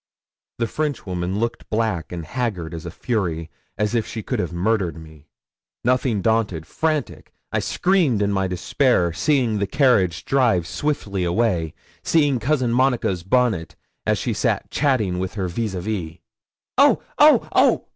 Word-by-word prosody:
The 115 - 0
Frenchwoman 100 - -2
looked 115 +1 -3
black 110 -7 -1
and 85 -2 -5
haggard 100 -8 -3
as 80 0 -6
a - - -3
fury, 85 -5 -2 0.3
as 105 +1 0
if 115 -2 0
she 110 - -6
could - - -2
have 90 - -2
murdered 90 0 0
me. 80 -2 -14 0.6
Nothing 125 -4 +1
daunted 110 -8 0
frantic 155 - -2 0.2
I - - +1
screamed 175 - +2
in 100 - +1
my 95 -1 0
despair, 90 - +1
seeing 125 - +1
the 100 - 0
carriage 115 - +2
drive 120 -11 +2
swiftly 100 - -2
away 85 -3 0 0.3
seeing 145 -6 +2
Cousin 130 -1 +1
Monica's 125 -8 +1
bonnet, 110 -3 +1 0.3
as - - +3
she - - -2
sat - - -1
chatting 110 -11 +1
with 95 +2 -4
her 95 -3 -2
vis 105 +2 -3
à 90 - -3
vis. 90 -5 -4 0.6
'Oh, - - +5 0.2
oh, - - +6
oh!' - - +3
105 Hz, 155 wpm, -22 LUFS, 90-125 Hz, 0.6 s, oh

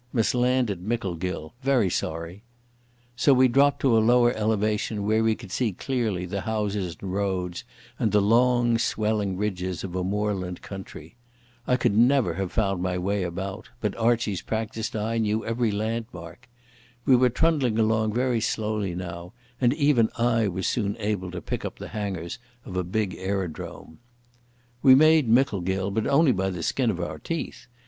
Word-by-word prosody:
Must 115 -3 +1
land 125 -1 +2
at 95 - -5
Micklegill. 90 -6 -3
Very 130 -8 +2
sorry." 85 +5 -4 0.7
So 135 +3 +4
we 130 0 +6
dropped 140 +3 +3
to 130 -4 +3
a - - +5
lower 120 +1 +4
elevation 105 -1 -1
where 110 +1 +2
we 110 -1 +2
could 95 - -12
see 115 0 0
clearly 110 -5 -2
the 100 +2 -4
houses 105 -6 -2
and 95 -2 -5
roads 95 -3 -2 0.4
and 110 - +1
the 105 - +4
long 120 +2 +3
swelling 105 -4 0
ridges 95 -3 -3
of 90 -2 -6
a 90 - -1
moorland 95 -2 -2
country. 95 0 -9 0.5
I 125 - +3
could 120 -5 +1
never 120 -5 +4
have 95 +1 -3
found 95 -4 0
my 90 0 -1
way 100 +3 -1
about, 95 +4 -5
but 105 -4 -2
Archie's 115 -4 +1
practised 110 0 -3
eye 110 +2 -1
knew 110 0 0
every 115 0 0
landmark. 110 -1 -5 0.6
We 135 - +6
were 125 0 +4
trundling 130 -4 +1
along 110 -1 +1
very 125 -2 +1
slowly 105 -4 -1
now, 85 0 -7 0.3
and 120 -1 +4
even 140 -7 +3
I 115 -2 +2
was 95 -1 -3
soon 105 -2 -1
able 105 -4 -2
to 90 -1 -7
pick - - -4
up - - -5
the - - -8
hangars 95 -5 -4 0.3
of 90 - -8
a 90 - 0
big 95 +1 -2
aerodrome. 95 -4 -5 0.8
We 130 -2 +8
made 155 -2 +5
Micklegill, 95 -6 +1
but 110 +2 -1
only 140 +1 +4
by 95 -3 0
the 90 -3 -5
skin 125 +5 +1
of 95 -5 -2
our 85 - -4
teeth. 125 -7 -5
105 Hz, 170 wpm, -25 LUFS, 95-120 Hz, 0.8 s, We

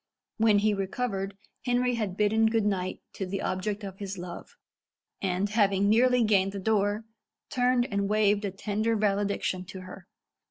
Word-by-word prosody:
When 220 -2 +4
he 210 +1 +3
recovered, 195 0 -3 0.3
Henry 245 0 +2
had 210 -5 -2
bidden 220 +1 +3
good 220 -1 +1
night 185 -3 -1
to 190 - -4
the 195 +1 -3
object 200 +3 -2
of 195 -1 -7
his 200 -1 -5
love, 175 0 -8 0.7
and, 190 +1 0
having 200 -2 +3
nearly 250 +2 +4
gained 195 -3 +2
the 200 - -4
door, 205 +1 +1 0.5
turned 250 -1 +2
and 200 -4 -1
waved 210 -1 +3
a 200 - -1
tender 210 +3 -1
valediction 200 -3 0
to 190 +1 -9
her. 185 0 -11
205 Hz, 160 wpm, -28 LUFS, 195-220 Hz, 0.7 s, When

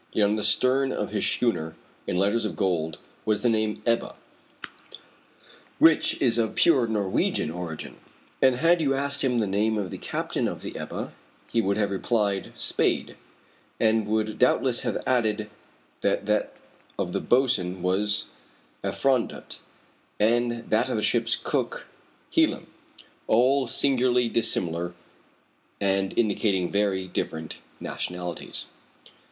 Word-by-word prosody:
Yet 105 -2 +3
on 105 - +1
the 105 - -2
stern 135 +4 +3
of 105 - -3
his 105 -2 0
schooner, 80 -10 -1 0.3
in 90 - -1
letters 100 +5 +2
of 110 - -3
gold, 80 -5 -1 0.3
was 105 -1 0
the 120 - +4
name 110 -1 -1
Ebba, 115 0 0 1.6
which 160 -1 +4
is 120 -2 +3
of 110 -2 0
pure 135 -8 +4
Norwegian 100 -7 0
origin. 85 -2 -6 0.4
And 130 -1 +5
had 165 +5 +3
you 135 -3 +1
asked 140 +1 0
him 125 -2 +1
the 110 - +1
name 105 +3 0
of 100 -3 -3
the - - -6
captain - - -2
of - - -6
the - - -6
Ebba, - - -5 0.4
he 115 - +2
would 100 -1 0
have 105 -2 0
replied, 100 -1 0
Spade, - - +1 0.6
and 110 -2 +2
would 110 0 -1
doubtless 125 0 +3
have - - -2
added 110 -4 0 0.5
that - - 0
that - - 0 0.4
of 90 - -2
the 100 - -1
boatswain 105 -9 +1
was 100 +3 +1 0.6
Effrondat, 130 -3 -1 0.6
and 120 +2 +1
that - - +2
of - - -1
the - - -1
ship's - - +2
cook, - - -3 0.5
Helim - - +2 0.6
all 130 +3 +3
singularly 125 -1 +2
dissimilar 85 -6 -1 0.8
and 95 -1 0
indicating 100 -5 +1
very 100 -2 0
different 80 -3 -4 0.2
nationalities. 90 -1 -2
110 Hz, 135 wpm, -26 LUFS, 95-120 Hz, 1.6 s, And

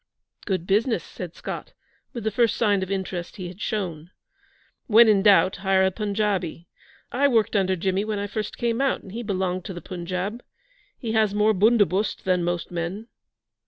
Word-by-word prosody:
'Good 185 -4 -1
business!' 210 - +1
said 175 -3 -8
Scott, - - -7 0.4
with 235 - -6
the 220 - 0
first 230 +1 +2
sign 205 -4 +2
of 190 - -3
interest 190 -3 -4
he 185 -4 -6
had 185 +4 -12
shown. 175 -7 -3 0.8
'When 230 +1 +7
in 205 -3 +5
doubt 195 -2 +5
hire 190 -1 +2
a 190 - +2
Punjabi. 200 -4 -2 0.4
I 280 +3 +3
worked 225 -5 +2
under 190 -2 +2
Jimmy 190 +2 0
when 215 -1 -2
I 200 - -2
first 210 +1 -4
came 235 +1 0
out 275 - +1
and 190 - -11
he 230 +4 -5
belonged 185 -4 -2
to 190 - -6
the 175 - -7
Punjab. 185 +5 -4 0.6
He 230 -4 -4
has 215 -2 +2
more 210 +1 +4
bundobust 205 -1 +2
than 180 -2 +1
most 175 0 -2
men.' 175 +7 -4
195 Hz, 180 wpm, -24 LUFS, 185-220 Hz, 0.8 s, When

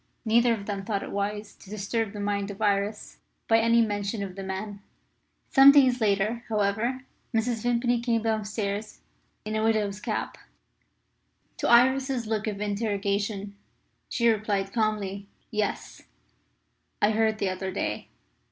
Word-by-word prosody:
Neither 235 +1 +4
of 200 -2 -8
them 200 -2 -4
thought 200 -1 -2
it - - -7
wise 205 +1 -3
to 190 - -17
disturb 215 +1 -2
the 205 - -8
mind 200 0 -1
of 200 - -8
Iris 205 0 -1 0.3
by 225 0 +5
any 230 +1 +4
mention 205 0 -2
of 190 -2 -7
the 195 - -6
man. 195 +2 -5 0.7
Some 270 0 +9
days 260 -4 +4
later, 215 +3 +1
however, 220 +5 0 0.3
Mrs. 225 0 0
Vimpany 240 0 +1
came 230 -2 0
downstairs 215 -1 -2 0.4
in 215 0 -3
a 215 - 0
widow's 210 -3 +1
cap. - - -4 1.2
To - - -1
Iris's 260 +1 +4
look 215 0 -2
of 205 -2 -3
interrogation 205 -1 -2 0.5
she 235 - +1
replied 205 -3 0
calmly, 205 -3 -1 0.2
"Yes, 210 -2 -3 1.0
I 210 - +3
heard 220 0 +1
the 195 - 0
other 185 +1 -3
day. 195 - -3
215 Hz, 145 wpm, -27 LUFS, 200-230 Hz, 1.2 s, Some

